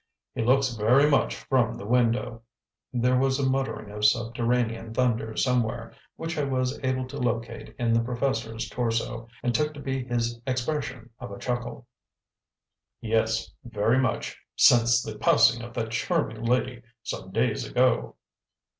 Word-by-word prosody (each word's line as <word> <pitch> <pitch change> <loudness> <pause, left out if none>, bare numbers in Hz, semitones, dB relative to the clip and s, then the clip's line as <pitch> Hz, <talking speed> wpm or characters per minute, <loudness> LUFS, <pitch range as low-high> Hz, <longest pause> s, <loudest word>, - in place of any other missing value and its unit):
He - - -3
looks 130 +1 +3
very 120 +6 +4
much 145 - +2
from 125 -4 0
the - - -8
window" 120 0 +1 0.5
there 125 +1 +2
was 135 0 +2
a 140 -2 +1
muttering 130 -6 -2
of 105 0 -6
subterranean 115 0 +1
thunder 115 -3 0
somewhere, 115 -3 0 0.2
which 165 -1 -4
I - - +1
was 130 -1 -1
able 130 0 0
to - - -7
locate 115 -1 -3
in 115 -1 +1
the 115 - +4
professor's 120 -2 -2
torso, 115 0 -2 0.2
and 120 - +1
took 150 +5 0
to - - -8
be 135 -2 -3
his 120 -1 -2
expression 130 -2 -3
of - - -7
a 100 - -8
chuckle 120 0 -4 1.1
"yes, 110 0 0
very 115 +1 +1
much, 130 0 -1 0.2
since 120 0 +5
the 105 -1 -7
passing 115 +2 +4
of 120 0 -9
that 115 -2 -2
charming 115 -3 -1
lady 125 0 0 0.2
some 115 -5 -6
days 115 +2 0
ago." 125 -1 +1
120 Hz, 150 wpm, -26 LUFS, 115-130 Hz, 1.1 s, since